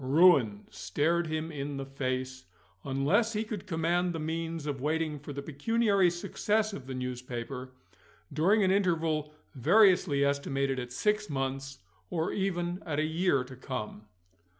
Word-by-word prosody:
Ruin 130 - +5
stared 170 +3 0
him 155 +1 -3
in 140 -1 -4
the 135 - -4
face, 130 -1 -3 0.4
unless 150 - +1
he 215 +1 0
could 210 -3 -6
command 175 +1 +1
the 165 - -3
means 165 0 -3
of 140 -3 -3
waiting 155 0 -1
for 145 +1 -8
the 140 0 -5
pecuniary 200 +6 +2
success 210 +5 -1
of 130 -8 -8
the 130 - -5
newspaper, 125 0 -5 0.6
during 195 +8 +3
an 190 - +3
interval 165 -6 +1 0.2
variously 175 - +4
estimated 140 -1 0
at 125 0 -6
six 210 +9 0
months, 135 -2 -3 0.3
or 165 0 -1
even 180 -2 -1
at 150 -3 -3
a 155 - +2
year 160 -4 +1
to 130 +1 -11
come. 110 -5 -6
155 Hz, 150 wpm, -30 LUFS, 135-180 Hz, 0.6 s, Ruin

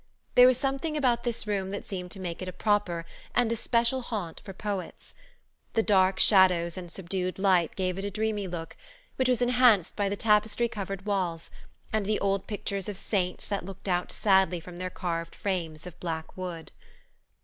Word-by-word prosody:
There 250 0 +9
was 255 -1 +4
something 275 +3 -1
about 245 -5 +2
this 235 -3 0
room 200 -2 -1
that 200 +1 -5
seemed 180 -2 -5
to 190 - -7
make 175 -2 -5
it 185 - -4
a - - -3
proper 185 -4 0 0.3
and 240 -2 +3
especial 235 +2 +1
haunt 205 -9 -5
for 195 - -8
poets. 195 -1 -5 0.6
The 225 - +3
dark 190 -2 +4
shadows 185 -4 +5
and 180 -2 -7
subdued 185 0 -3
light 185 -4 +3
gave 185 -1 -1
it 195 - -3
a - - -1
dreamy 210 -1 -1
look, 170 -2 -6 0.4
which 260 -1 +2
was 245 -1 +2
enhanced 245 -7 +4
by 200 -1 0
the 200 - -1
tapestry 215 +2 +3
covered 195 -3 -5
walls, 180 -5 -2 0.4
and 215 -2 0
the 215 - +1
old 195 -1 0
pictures 200 -2 -3
of 200 - -5
saints 185 -3 -1
that 200 -2 -2
looked 195 +2 -9
out 180 -1 0
sadly 190 -3 +3
from 175 +1 -10
their 185 +1 -3
carved 170 -2 -4
frames 165 -5 -3
of 180 -1 -10
black 160 -2 -4
wood. 180 -3 -6
195 Hz, 185 wpm, -28 LUFS, 180-215 Hz, 0.6 s, There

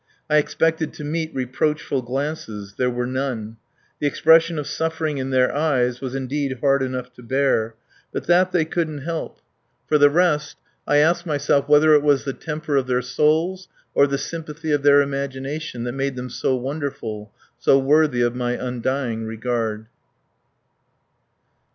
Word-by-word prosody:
I 150 - +5
expected 160 +1 +1
to - - -8
meet 160 +2 -2
reproachful 135 +1 -1
glances. 125 -6 -4
There 125 - +1
were 125 0 -2
none. 125 -4 -3 0.4
The 145 - +1
expression 165 +3 +4
of 150 - -3
suffering 160 -2 -2
in 130 0 -3
their 130 -1 +2
eyes 130 -5 +1
was 130 -1 -4
indeed 135 0 -2
hard 140 -1 +2
enough 130 -1 -4
to - - -15
bear. 125 -3 0 0.4
But - - -4
that 180 +2 +4
they 175 -4 +2
couldn't 155 -4 -3
help. 165 +1 -5 0.5
For 150 - +3
the 145 0 +7
rest, 150 -2 +1 0.3
I 145 - +3
ask 170 +4 +3
myself 145 -1 +1
whether 150 +1 +6
it 150 - +6
was 145 -2 +2
the 135 - -3
temper 150 -1 -3
of 130 -2 0
their 125 0 0
souls 160 +8 +1 0.3
or 140 - +5
the 140 0 -1
sympathy 155 +1 -5
of 145 -1 +2
their 145 0 +6
imagination 140 -1 -4
that 120 - -2
made 135 +1 -2
them 125 0 -6
so 130 - 0
wonderful, 125 -6 -5 0.3
so 135 - +5
worthy 140 -2 +3
of 120 0 +1
my 125 -1 -1
undying 125 -2 -2
regard. 110 -1 -2
140 Hz, 160 wpm, -22 LUFS, 125-155 Hz, 0.5 s, the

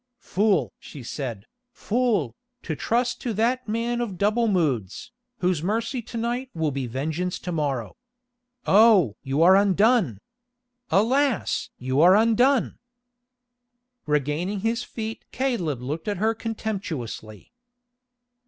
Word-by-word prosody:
"Fool!" 205 -2 +1
she 140 -5 -11
said, 120 -5 -5 0.3
"fool, 215 - 0 0.3
to 155 - -3
trust 240 - -1
to 240 - -2
that 245 +4 0
man 235 +2 -1
of 205 -6 -4
double 215 +5 +2
moods, 145 - -1 0.3
whose 180 -4 +1
mercy 230 - -1
to 230 - -8
night 240 +3 -2
will 160 -2 0
be 135 -2 -3
vengeance 155 +9 -3
to 180 - -6
morrow. 140 -8 -2 0.7
Oh! 200 - +5
you 140 +3 +1
are 185 +2 +7
undone! 200 - +3 0.7
Alas! 255 +4 +1
you 130 +3 0
are 180 +3 +7
undone!" 230 +4 +3 1.3
Regaining 150 +7 -1
his 230 +3 0
feet 225 -1 -6
Caleb 180 - -2
looked 150 +9 -4
at 205 -2 -1
her 220 +4 +1
contemptuously. 190 - -5
195 Hz, 120 wpm, -24 LUFS, 150-230 Hz, 1.3 s, are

